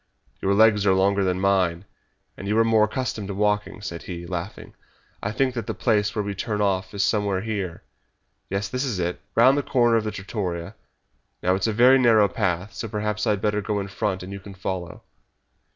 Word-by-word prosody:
"Your 100 +1 +2
legs 110 -1 +5
are 95 - +5
longer 100 +1 +2
than 90 -1 0
mine, 95 -2 +1 0.5
and 100 - -8
you 105 +2 +1
are 115 - +6
more 110 -1 +4
accustomed 110 -2 -3
to 100 - -4
walking," 105 0 0
said 85 -4 -5
he, 85 -1 -7
laughing. 85 -1 -6 0.5
"I 100 - -2
think 130 +3 +1
that 115 -4 -4
the - - -3
place 105 -3 +1
where 105 - 0
we 100 0 -3
turn 105 +1 -3
off 95 -1 0
is 100 - +1
somewhere 100 -3 +1
here. 100 -7 -4 0.7
Yes, 100 +1 -1
this 125 +6 -2
is 120 -8 -2
it, 90 0 -2
round 130 +5 +5
the - - +1
corner 120 -4 +3
of 110 - 0
the 110 - -2
trattoria. 95 -3 -4 0.7
Now, 90 - +3
it 95 - 0
is 100 - 0
a - - +1
very 125 +5 +6
narrow 110 -4 +5
path, 95 -1 -2
so 115 - -5
perhaps 105 +1 -2
I - - +4
had 100 - -4
better 105 0 0
go 105 +1 -2
in 100 0 -4
front 95 -1 -2
and 95 +2 -7
you 100 - -6
can 100 0 -11
follow." 90 -2 -5
100 Hz, 215 wpm, -24 LUFS, 95-110 Hz, 0.7 s, are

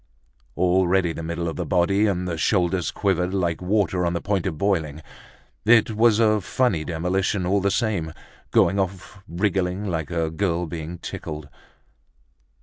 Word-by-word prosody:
Already 90 -1 +2
the 85 - -6
middle 85 +1 -3
of 80 - -4
the - - -1
body 100 +3 +2
and 90 -2 -1
the 85 - -2
shoulders 90 +2 +1
quivered 95 -1 0
like 85 -3 -1
water 95 -1 +1
on 85 0 0
the 85 - -1
point 100 -2 -1
of 80 -5 -3
boiling. 80 -5 -1 0.6
It 115 0 +5
was 110 0 +4
a 110 -2 +3
funny 95 -5 0
demolition 90 +3 -1
all 100 +2 +2
the 100 - +2
same, 100 -6 -1 0.4
going 100 - +3
off 95 +1 -4
wriggling 95 +1 -1
like 80 -5 -2
a 85 -2 -1
girl 85 0 -1
being 80 +1 -6
tickled. 75 -3 -7
90 Hz, 155 wpm, -23 LUFS, 85-100 Hz, 0.6 s, It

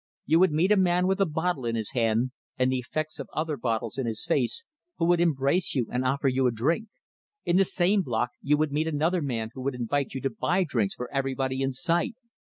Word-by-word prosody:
You 160 +2 +4
would 185 -2 +5
meet 165 +6 +2
a 210 - +6
man 180 -1 +3
with 190 +1 +1
a 195 - +4
bottle 160 -2 -1
in 115 -1 -1
his 110 -2 -3
hand, 120 0 +1 0.3
and 130 0 +2
the 130 - 0
effects 155 +5 -4
of - - -6
other 155 -1 -1
bottles 115 -1 -2
in 130 - -1
his 110 +3 -4
face, 165 - 0 0.3
who 165 - +1
would 175 0 +3
embrace 155 +1 +1
you 125 -4 +1
and 125 +1 0
offer 135 +2 +1
you 130 0 +2
a - - +2
drink; 155 - 0 0.6
in 175 - +3
the 195 - +5
same 190 +3 +2
block 120 -5 -1
you 150 +1 +2
would 155 -1 0
meet 155 +3 0
another 160 +3 +1
man 115 -6 -3
who 130 - -7
would 135 0 -2
invite 135 +3 -2
you 135 - -3
to 135 - -1
buy 190 -3 +1
drinks 115 - -1
for 125 - -5
everybody 135 -1 -1
in 135 0 +1
sight. 175 - 0
140 Hz, 235 wpm, -27 LUFS, 125-170 Hz, 0.6 s, a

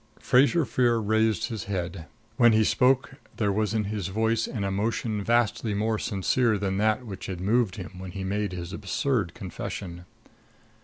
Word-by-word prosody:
Fraser 145 +5 +4
Freer 120 -3 +2
raised 110 +1 +1
his 110 -5 -5
head. 90 -4 -4 0.3
When 120 -2 +5
he 110 0 +4
spoke 130 +4 +2 0.2
there 105 -2 +1
was 105 +1 0
in 110 - +1
his 100 -3 -3
voice 110 +3 0
an 110 -5 -4
emotion 105 +2 -1
vastly 115 -1 +1
more 110 +1 0
sincere 110 +3 +1
than 95 -1 -1
that 110 +3 +1
which 100 -4 -7
had 95 -2 -5
moved 105 +1 +1
him 90 -6 -7
when 95 0 -7
he 95 0 -5
made 100 +1 -1
his 90 0 -6
absurd 100 -2 -1
confession. 90 -1 -6
105 Hz, 165 wpm, -26 LUFS, 95-115 Hz, 0.3 s, When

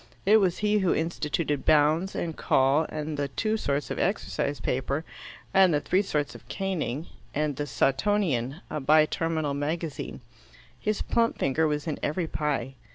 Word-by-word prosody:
It 210 +3 +7
was 190 -5 +2
he 210 0 +2
who 190 -3 +2
instituted 155 -2 -1
Bounds, 155 +5 +3
and 165 -2 -3
call, 135 +4 +3
and 155 0 -4
the 140 0 0
two 215 +10 -1
sorts 145 -9 -1
of - - -3
exercise 160 - -1
paper, 135 +6 -1 0.5
and 190 -2 +6
the - - +3
three 185 +6 +2
sorts 150 -7 -2
of - - -13
caning, 170 -7 -2 0.3
and 150 -1 0
"The 145 +2 -3
Sawtonian," 135 - +1
a 150 - -2
bi 155 +3 +5
terminal 160 -2 -1
magazine. 145 -1 -3 0.6
His 210 - -1
plump 230 0 +1
finger 155 +4 +1
was 150 -1 -2
in 155 -3 -3
every 165 +3 -1
pie. 145 -5 -2
155 Hz, 160 wpm, -27 LUFS, 145-180 Hz, 0.6 s, It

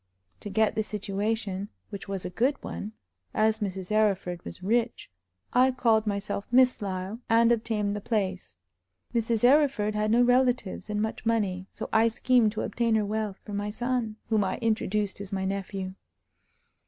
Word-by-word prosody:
To 205 - -7
get 220 +1 +2
the 220 - 0
situation, 205 -1 -2 0.2
which 200 -1 -7
was 195 -2 -4
a - - -4
good 255 +9 +2
one, 210 +2 -6 0.4
as 220 0 +2
Mrs. 190 -2 -4
Arryford 195 -5 +1
was - - -9
rich, 230 - 0 0.4
I 255 +1 +5
called 225 -4 +2
myself 200 0 -2
Miss 255 -1 +4
Lyle, 190 +2 -4
and 230 +1 +5
obtained 220 -3 0
the 205 - -4
place. 190 - -2 0.6
Mrs. 230 -1 0
Arryford 255 -5 +4
had 210 0 0
no 235 +3 +5
relatives 245 -5 +1
and 210 0 0
much 220 - -4
money, 200 -5 0
so - - -6
I 225 +1 +5
schemed 230 -1 +3
to 220 - -3
obtain 230 -2 0
her 215 -1 +2
wealth 210 -1 -2
for 205 - -7
my 205 +1 -2
son, 240 0 -2
whom 215 -2 +3
I 190 - -1
introduced 210 -3 -1
as 200 - -8
my 190 -1 -1
nephew. 195 -1 -3
215 Hz, 165 wpm, -27 LUFS, 200-230 Hz, 0.6 s, I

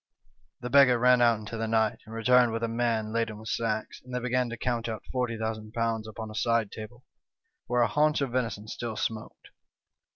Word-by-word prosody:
" - - -41
The 125 - -4
beggar 135 -2 +6
ran 125 +1 +5
out 120 -2 +5
into 110 +2 -7
the 115 0 -2
night, 110 -1 +1
and 110 - -8
returned 125 +1 +4
with 115 +1 -3
a - - +1
man 115 -2 -1
laden 115 -2 -1
with 110 +1 -8
sacks, 110 -2 -2
and 125 - -14
they - - 0
began 125 0 0
to 120 - -6
count 120 -1 -2
out 110 -1 -5
^40,000 115 -2 -2
upon 110 0 -7
a - - -9
side 115 -1 +1
table, 115 +3 -9 0.6
where 125 0 +2
a - - +3
haunch 150 0 +2
of 135 -3 -1
venison 115 -4 -2
still 115 0 -5
smoked. 110 0 -5
115 Hz, 200 wpm, -28 LUFS, 110-125 Hz, 0.6 s, beggar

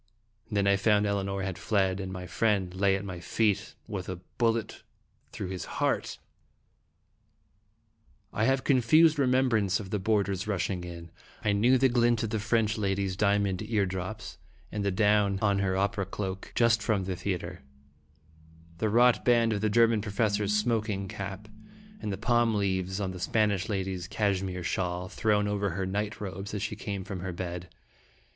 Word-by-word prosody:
Then 100 -3 +1
I 100 0 +4
found 105 +1 +3
Elinor 100 -1 -1
had 95 -2 -4
fled, 95 -3 +1
and 95 -1 -5
my 90 -1 -6
friend 95 0 0
lay 95 +1 +2
at 100 +1 -4
my 95 -3 -6
feet 105 +3 0
with 95 -3 -5
a 95 - -3 0.2
bullet 115 -2 0 0.5
through - - -5
his 90 -3 -5
heart! - - 0 2.2
I 110 - +1
have 135 +1 +2
a - - -25
confused 150 +4 +4
remembrance 125 -7 +2
of 95 -3 -8
the 105 - 0
board 105 0 +1
ers 95 0 -3
rushing 95 -2 -1
in. 85 -1 -9 0.3
I 105 - +3
knew 120 +6 +4
the 135 +1 +4
glint 120 -2 +2
of 110 - -2
the 110 - 0
French 110 0 +1
lady's 95 -2 -1
diamond 100 -1 +1
ear 110 -2 0
drops, 95 +2 -6 0.3
and 105 -1 -3
the 100 - +1
down 105 0 +3
on 100 -2 +2
her 95 -1 0
opera 100 0 0
cloak, 95 -1 -5
just 115 -1 +4
from 105 -2 0
the 95 0 -3
theatre, 90 -3 -4 1.2
the 110 - +1
wrought 120 +3 +4
band 115 -2 +3
of 100 - -2
the 110 - +2
German 115 0 +4
professor's 105 0 0
smoking 105 -3 0
cap, 100 +2 -6 0.5
and 105 - -3
the 95 - -3
palm 120 0 +2
leaves 95 -1 -1
on 95 -2 -2
the 90 - -8
Spanish 105 -1 +1
lady's 95 -3 -2
cashmere 95 -3 -1
shawl, 90 0 -2
thrown 105 0 +1
over 100 0 0
her 95 +2 -2
night 105 +3 -3
robes 100 +1 -5
as 100 - -3
she 105 0 -3
came 100 -2 -4
from 95 0 -6
her 95 +1 -4
bed. 90 0 -5
100 Hz, 175 wpm, -28 LUFS, 95-110 Hz, 2.2 s, I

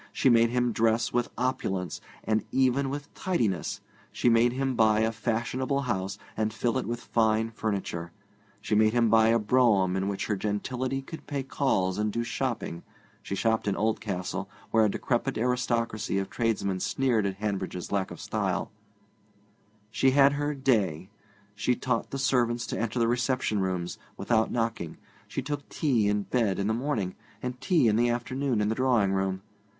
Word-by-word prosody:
She 135 - +2
made 115 0 +5
him 125 0 +1
dress 115 +1 +1
with 120 -1 +1
opulence, 95 -8 -2 0.2
and 110 0 +1
even 135 +1 +2
with 145 +1 -6
tidiness; 115 - -1 0.3
she 120 - +2
made 115 +1 +4
him 135 +1 -1
buy 110 -2 +4
a 110 0 +2
fashionable 120 +4 -1
house 100 -6 -2 0.2
and 110 0 0
fill 115 +4 0
it - - -4
with 120 0 -2
fine 110 0 +1
furniture; 95 -6 -3 0.5
she 105 +1 -3
made 110 +1 +4
him 115 -2 +3
buy 110 0 +6
a 115 +1 +4
brougham 105 -5 +3
in 95 +1 0
which 100 -1 -2
her 105 - 0
gentility 125 +7 -2
could 160 +4 -10
pay 140 -2 -2
calls 100 -9 0
and 105 0 0
do 115 +3 -1
shopping 120 -8 -3 0.4
(she 100 - -4
shopped 110 +1 +1
in 100 - +1
Oldcastle, 105 -4 -2 0.2
where 110 -1 +5
a 105 - +4
decrepit 120 +4 -1
aristocracy 115 -3 0
of 95 0 -2
tradesmen 110 -5 0
sneered 120 -2 +1
at 95 - -3
Hanbridge's 95 -3 -3
lack 100 -2 0
of - - -9
style); - - -2 1.2
she 135 - +3
had 140 +1 +5
her 145 +1 -1
'day'; 100 - +1 0.4
she 105 +5 +1
taught 125 -2 -1
the 135 - -4
servants 120 -3 +1
to - - -4
enter 115 +2 -2
the 115 -1 +3
reception 125 -2 0
rooms 90 -2 -2 0.2
without 110 +2 +1
knocking; 115 -9 -2 0.3
she 135 - -4
took 145 +1 -4
tea 120 -9 +1
in 105 0 +1
bed 110 -4 0
in 100 - -1
the 110 - +1
morning, 115 -7 -1 0.3
and 125 0 -4
tea 160 -5 +3
in 105 -1 +3
the 120 +1 +3
afternoon 125 0 -1
in 105 - +1
the 110 - +1
drawing 120 -5 +2
room. 95 0 -1
115 Hz, 175 wpm, -28 LUFS, 105-125 Hz, 1.2 s, buy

